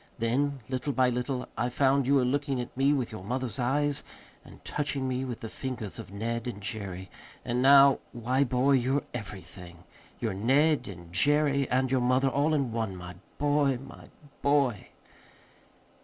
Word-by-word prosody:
Then, 135 +4 0
little 130 +2 -2
by 130 -1 +3
little, 125 +1 -2
I 125 - 0
found 135 +1 +2
you 140 - +4
were 130 -2 +3
looking 140 0 0
at 120 - -6
me 135 +2 +3
with 135 -5 0
your 110 -4 -8
mother's 125 +3 -3
eyes, 145 +3 0 0.4
and - - -16
touching 140 -2 -2
me 130 0 -1
with 125 -3 -5
the 115 - -5
fingers 115 -4 -6
of - - -9
Ned 115 +3 -3
and 115 -5 -5
Jerry. 95 -3 -5 0.3
And 120 +1 0
now 140 0 +7
why, 125 +3 +1
boy, 130 +1 +2
you're 135 +1 +2
everything. 90 -5 -9 0.4
You're 110 -4 -1
Ned 135 +6 +2
and 85 -3 -10
Jerry 140 +4 +3
and 130 0 +1
your 130 -2 +2
mother 130 +2 +3
all 145 +4 +1
in 135 -5 0
one, 110 -4 -2
my 90 -1 -8 0.2
boy, 145 -2 +2
my 135 +2 -12 0.4
boy!" 140 -7 +2
130 Hz, 170 wpm, -28 LUFS, 115-140 Hz, 0.4 s, now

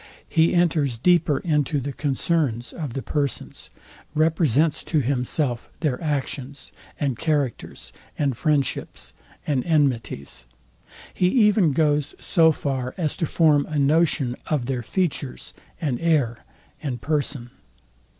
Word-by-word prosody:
He 165 +2 +3
enters 155 -8 +2
deeper 165 +1 +3
into 150 -4 +1
the 140 +1 -4
concerns 140 -4 -1
of 150 -8 -5
the 135 - -4
persons: 145 -3 -3 0.5
represents 155 -2 +2
to 160 - +1
himself 125 -1 -1
their 145 -6 0
actions, 140 -2 -3 0.3
and 135 -6 -1
characters, 140 - -2 0.2
and 140 -4 0
friendships, 140 - -1 0.3
and 135 -4 0
enmities: 125 - 0 0.7
He 180 - +2
even 210 - +4
goes 150 -1 +1
so 165 -3 +4
far 130 -4 -3
as 160 -5 -1
to 165 - -1
form 150 -3 +3
a 155 - -3
notion 140 -3 +2
of 145 -6 0
their 125 -1 -2
features, 145 - -2 0.3
and 140 -8 -1
air, 145 -9 +1 0.4
and 130 -5 -3
person. 140 -3 -2
145 Hz, 120 wpm, -24 LUFS, 130-160 Hz, 0.7 s, even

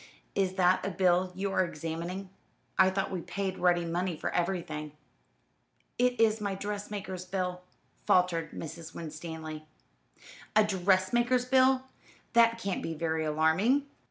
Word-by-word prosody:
"Is 190 -1 0
that 185 -1 +3
a - - -1
bill 180 0 +2
you 195 +1 -2
are 185 - +3
examining? 170 +3 -5 0.4
I 190 -1 +6
thought 190 +1 -2
we 185 -2 -3
paid 195 0 -3
ready 175 -1 +3
money 175 0 -1
for - - -3
everything." 170 -4 -2 1.1
"It 250 0 +2
is 220 -1 +3
my 200 -2 -1
dressmaker's 200 -2 -5
bill," 180 -1 -3 0.5
faltered 170 -3 +3
Mrs. 165 +1 -8
Winstanley. 155 -1 -7 0.9
"A 215 - +7
dressmaker's 210 +6 +2
bill! 260 0 +4 0.5
That 230 -1 +5
can't 200 -5 -2
be 165 - -4
very 160 0 -1
alarming. 160 - +2
185 Hz, 130 wpm, -30 LUFS, 165-200 Hz, 1.1 s, A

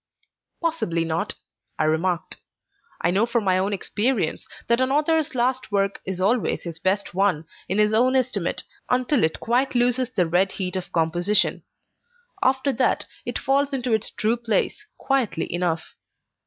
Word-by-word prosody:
"Possibly 245 - 0
not," 160 0 -1 0.4
I - - +1
remarked. 165 +3 0 0.6
"I 175 - +2
know 205 +6 +2
from 235 -1 0
my 185 -1 +2
own 195 +2 0
experience, 205 -1 0 0.2
that 235 +2 +2
an 260 - +2
author's 310 +1 +1
last 255 0 0
work 200 -1 0
is 190 -1 -3
always 215 +6 +1
his 165 -2 -4
best 190 +1 0
one, 185 -4 +1 0.2
in 190 - 0
his 210 0 +3
own 250 +4 +3
estimate, 240 -9 0 0.3
until 250 +2 +2
it 160 0 +1
quite 250 +3 0
loses 245 +1 +2
the 185 -8 +1
red 180 +4 +1
heat 185 -1 -3
of 185 - -4
composition. 175 +5 +2 0.8
After 265 +1 +2
that, - - +1 0.2
it - - -2
falls 280 +1 +1
into 250 -3 -1
its 220 0 +1
true 225 +3 0
place, 235 - -1
quietly 250 -14 -1
enough. 175 -2 -2
210 Hz, 155 wpm, -24 LUFS, 180-255 Hz, 0.8 s, his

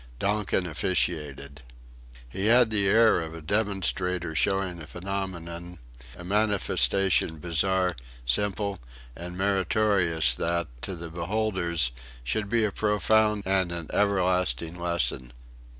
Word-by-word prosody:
Donkin 100 +1 0
officiated. 75 -4 -1 0.7
He 95 - -2
had 120 0 +5
the 100 -2 +2
air 110 -2 +5
of 80 0 -6
a - - -7
demonstrator 90 -2 -1
showing 90 +3 0
a 75 - -9
phenomenon, 90 -2 -5 0.4
a 90 - -9
manifestation 95 -3 +2
bizarre, 90 +3 +1 0.3
simple, 100 - -1 0.4
and 90 +1 -8
meritorious 95 - +2
that, 85 +4 -2
to 95 - -5
the 85 -1 -8
beholders, 85 - 0 0.3
should 100 - -2
be 115 0 +2
a 105 - -1
profound 105 0 +2
and 95 -2 +1
an 85 -3 -5
everlasting 90 -4 +1
lesson. 85 -8 -1
90 Hz, 115 wpm, -27 LUFS, 85-100 Hz, 0.7 s, had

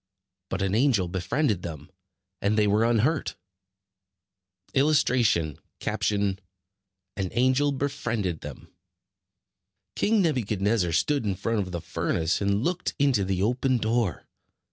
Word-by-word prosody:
But 95 +1 -2
an 95 0 0
angel 115 -6 +3
befriended 95 - 0
them 75 -4 -8 0.5
and 105 +2 +1
they 105 - +4
were 105 +2 +3
unhurt. 120 +6 +1 1.4
[Illustration: 125 - +2 0.3
An 100 -2 0 0.9
angel 130 +4 +3
befriended 120 - -2
them] 75 -2 -9 1.3
King 215 -1 +2
Nebuchadnezzar 105 - +1
stood 140 - +1
in 100 -3 -1
front 115 +4 -1
of 95 -2 -3
the 85 -2 -4
furnace, 80 +3 -1
and 100 +2 +1
looked 180 +2 -1
into 135 -8 +2
the 95 0 -1
open 125 +3 +1
door. 110 -5 -1
110 Hz, 115 wpm, -26 LUFS, 95-130 Hz, 1.4 s, they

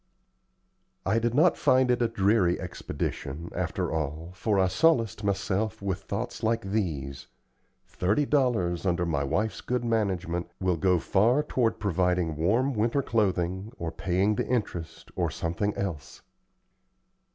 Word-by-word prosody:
I 110 +4 +2
did 120 +1 0
not 165 +5 +5
find 130 -1 +4
it 125 - +1
a 120 - +3
dreary 100 -4 +2
expedition, 75 +5 -5
after - - -2
all, 80 +2 -3
for 100 +3 0
I 95 -1 +4
solaced 115 - +2
myself 100 +1 -1
with 100 -1 -3
thoughts 110 +5 -4
like 115 0 +1
these, 75 - -2 0.6
"Thirty 105 +11 0
dollars, 120 - +1
under 90 -2 +1
my 80 -4 0
wife's 105 +9 -1
good 125 -1 -2
management, 95 -7 -1
will 90 -2 +1
go 90 +1 +3
far 115 - +3
toward 120 -6 0
providing 90 -4 +1
warm 115 - +1
winter 120 +5 +1
clothing, 95 -2 0
or 85 -1 -4
paying 95 +5 +1
the - - -2
interest, 85 -10 -3
or - - 0
something 85 +5 -2
else." 85 -9 -5
95 Hz, 140 wpm, -27 LUFS, 85-115 Hz, 0.6 s, not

